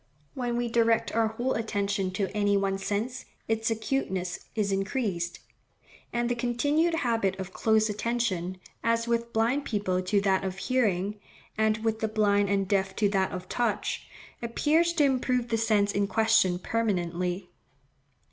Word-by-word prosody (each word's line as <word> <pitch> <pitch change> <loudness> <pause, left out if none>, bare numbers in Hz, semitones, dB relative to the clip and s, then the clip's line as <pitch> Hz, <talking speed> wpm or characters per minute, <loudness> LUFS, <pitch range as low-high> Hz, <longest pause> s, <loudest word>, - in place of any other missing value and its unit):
When 245 -2 -2
we 240 0 0
direct 230 -1 +2
our 225 0 +3
whole 240 +4 -1
attention 200 -3 -1
to 195 +1 -2
any 205 -1 +3
one 195 0 0
sense, 220 +7 -3 0.2
its 225 0 0
acuteness 215 -6 -2
is 205 -3 0
increased; 195 -4 -2 0.7
and 240 0 0
the 245 - +1
continued 285 +8 +1
habit 225 - 0
of 190 0 -6
close 220 -1 +3
attention, 210 -5 -1 0.3
as 230 0 +1
with 235 0 0
blind 235 +6 +1
people 200 -7 -1
to 185 +3 +1
that 195 -1 +2
of 190 -1 -3
hearing, 205 -3 0 0.4
and 220 0 +1
with 220 -1 +1
the 220 - 0
blind 205 -2 +2
and 195 -1 +1
deaf 195 0 0
to 205 -2 +2
that 190 -1 +1
of 185 0 -6
touch, 235 -2 -1 0.3
appears 305 +8 +2
to 315 - +3
improve 255 -3 +1
the 225 - +1
sense 210 -2 +2
in 200 0 0
question 220 -4 +3
permanently. 180 -3 -1
215 Hz, 155 wpm, -28 LUFS, 195-235 Hz, 0.7 s, our